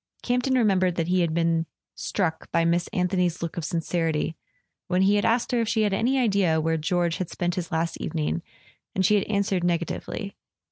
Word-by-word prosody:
Campton 250 +2 +1
remembered 190 -7 +3
that 165 -1 -1
he 185 0 +3
had 170 -2 +1
been 165 0 +1 0.3
struck 160 - -2
by 165 0 +2
Miss 170 +1 +1
Anthony's 180 -1 0
look 170 - -4
of 170 - -3
sincerity 165 -1 -1 0.5
when 180 +1 +2
he 200 +1 +4
had 205 - +1
asked 235 +3 +1
her 240 -2 +2
if 225 - -1
she 220 -2 +2
had 205 -2 +1
any 240 +7 +1
idea 200 -9 +2
where 160 +1 +1
George 170 +2 0
had 180 -2 -3
spent 175 0 -2
his 175 -1 -4
last 165 0 -1
evening, 80 +2 -2 0.5
and 190 - +2
she 210 - +4
had 205 -2 +3
answered 200 -3 0
nega¬ 170 -1 +1
tively. 200 +3 -5
180 Hz, 200 wpm, -25 LUFS, 165-200 Hz, 0.5 s, he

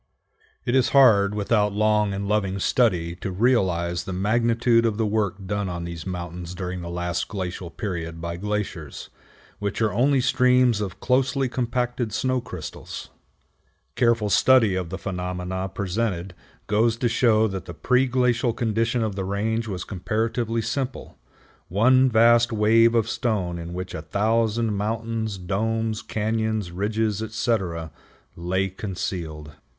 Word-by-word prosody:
It 120 - 0
is 130 - +3
hard 105 -6 +6
without 105 0 +1
long 105 0 +2
and 100 0 -3
loving 100 -2 0
study 90 -6 +1
to 95 - -4
realize 90 -5 +1
the - - -6
magnitude 115 +4 +2
of 110 -3 0
the 110 - +1
work 100 -2 -1
done 100 0 -2
on 85 -1 -4
these 85 0 -6
mountains 90 -1 -6
during 90 -1 -4
the 85 - -6
last 90 0 -2
glacial 90 -3 -5
period 85 -5 -5
by 85 0 -4
glaciers, 100 -6 -4 0.5
which 100 -1 -3
are 110 -2 +1
only 135 +5 +3
streams 125 -3 +3
of 100 -3 -5
closely 130 +1 +1
compacted 125 -1 -2
snow 130 +1 0
crystals. 90 - -8 0.8
Careful 115 -3 +2
study 125 -5 +5
of 90 -2 -2
the 95 - -4
phenomena 90 0 -4
presented 95 -2 -2 0.3
goes 110 +2 +2
to 120 - +1
show 115 -2 +3
that 95 -3 -5
the 85 - -7
pre 125 +8 +2
glacial 125 -1 +1
condition 115 +1 0
of 105 -3 -2
the 95 - -2
range 110 +4 -1
was 95 -4 -4
comparatively 115 +4 -2
simple: 130 +3 -4 0.5
one 130 +7 +4
vast 120 +1 +5
wave 115 +2 +4
of 115 -2 +2
stone 100 -9 -1
in 85 0 -7
which 90 +1 -5
a 80 - -4
thousand 110 +5 +1
mountains, 110 0 -2
domes, 110 +4 -1
cañons, 110 -3 -2
ridges, 105 +2 -1
etc., 95 -8 -2 0.4
lay 95 +3 -1
concealed. 90 -6 -5
105 Hz, 145 wpm, -24 LUFS, 90-115 Hz, 0.8 s, hard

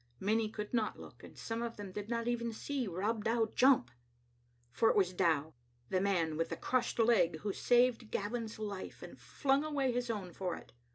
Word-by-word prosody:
Many 215 +2 +1
could 210 +1 -6
not 225 -3 0
look, - - -12
and - - -12
some 225 0 -4
of 235 -1 -4
them 205 -2 -7
did 205 +3 -6
not 230 0 -1
even 235 -1 0
see 265 +1 -3
Rob 205 +5 -1
Dow 225 0 +2
jump. 260 0 +4 0.8
For 225 - +3
it - - +2
was 185 -3 +3
Dow, 160 -4 +1 0.4
the 185 - +1
man 170 -6 +1
with 165 - 0
the - - -4
crushed 255 -1 0
leg, 225 -9 +3
who 205 -2 -2
saved 245 -1 +3
Gavin's 220 +2 -3
life, 205 -3 -6
and - - -10
flung 275 0 +1
away 285 -4 0
his 245 0 -2
own 195 -6 -3
for 180 -1 -3
it. - - -12
220 Hz, 195 wpm, -34 LUFS, 190-240 Hz, 0.8 s, jump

